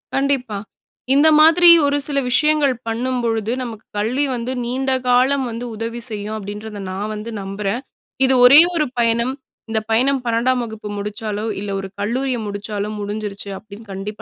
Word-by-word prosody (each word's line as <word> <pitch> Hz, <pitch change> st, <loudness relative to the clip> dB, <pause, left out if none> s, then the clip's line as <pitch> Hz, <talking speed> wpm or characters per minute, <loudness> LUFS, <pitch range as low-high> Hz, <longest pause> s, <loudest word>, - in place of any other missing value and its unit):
கண்டிப்பா. 270 Hz, -6 st, 0 dB, 0.6 s
"இந்த 290 Hz, +3 st, +5 dB
மாதிரி 330 Hz, +3 st, +7 dB, 0.2 s
ஒரு 285 Hz, 0 st, +2 dB
சில 285 Hz, -2 st, 0 dB
விஷயங்கள் 300 Hz, 0 st, +3 dB
பண்ணும்பொழுது, 230 Hz, -2 st, -1 dB
நமக்கு 225 Hz, -3 st, -8 dB
கல்வி 245 Hz, +8 st, 0 dB
வந்து 240 Hz, +1 st, -4 dB
நீண்ட 265 Hz, +2 st, -1 dB, 0.2 s
காலம் 260 Hz, +2 st, +3 dB
வந்து 230 Hz, +1 st, -5 dB
உதவி 230 Hz, +2 st, -5 dB
செய்யும்" 210 Hz, 0 st, -5 dB
அப்படின்றத 210 Hz, +1 st, -7 dB
நான் 205 Hz, +3 st, -4 dB
வந்து 215 Hz, +2 st, -6 dB
நம்புறேன். 195 Hz, +4 st, -3 dB, 0.4 s
இது 265 Hz, -, +3 dB
ஒரே 280 Hz, +5 st, +10 dB
ஒரு 305 Hz, -2 st, +2 dB
பயணம். 235 Hz, +2 st, +1 dB, 0.4 s
இந்த 220 Hz, 0 st, +1 dB
பயணம் 260 Hz, +4 st, +2 dB
12 240 Hz, +2 st, +1 dB
வகுப்பு 220 Hz, -2 st, -7 dB
முடிச்சாலோ, 210 Hz, +1 st, -4 dB
இல்ல 200 Hz, 0 st, -5 dB
ஒரு 195 Hz, -, -5 dB
கல்லூரிய 245 Hz, +5 st, -1 dB
முடிச்சாலோ, 205 Hz, 0 st, -4 dB
முடிஞ்சிருச்சு 205 Hz, -1 st, -5 dB
அப்படின்னு 215 Hz, +2 st, -13 dB
கண்டிப்பா 205 Hz, +3 st, -6 dB
230 Hz, 150 wpm, -20 LUFS, 210-260 Hz, 0.6 s, ஒரே